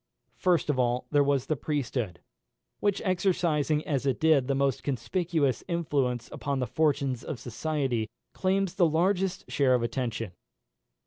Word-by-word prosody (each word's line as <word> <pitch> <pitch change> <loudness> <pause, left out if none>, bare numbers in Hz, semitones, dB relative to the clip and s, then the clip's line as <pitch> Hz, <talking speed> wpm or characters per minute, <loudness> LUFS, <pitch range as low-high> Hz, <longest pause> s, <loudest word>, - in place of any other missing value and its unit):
First 175 -4 +2
of 130 - -2
all, 125 0 +1
there 145 -1 +5
was 140 -2 +1
the 155 - 0
priesthood, 125 - -2 0.6
which, 205 -1 0
exercising 170 -5 +1
as 140 -2 -1
it 135 - +1
did 155 -5 +4
the 140 - +1
most 135 -2 +1
conspicuous 150 - 0
influence 145 -8 0
upon 140 -1 -2
the 130 - 0
fortunes 140 -1 0
of 130 - -5
society, 130 -3 -2 0.2
claims 190 -1 0
the 185 -3 +4
largest 185 +3 0
share 130 -3 +3
of 120 - 0
attention. 115 -4 -2
145 Hz, 145 wpm, -28 LUFS, 125-165 Hz, 0.6 s, there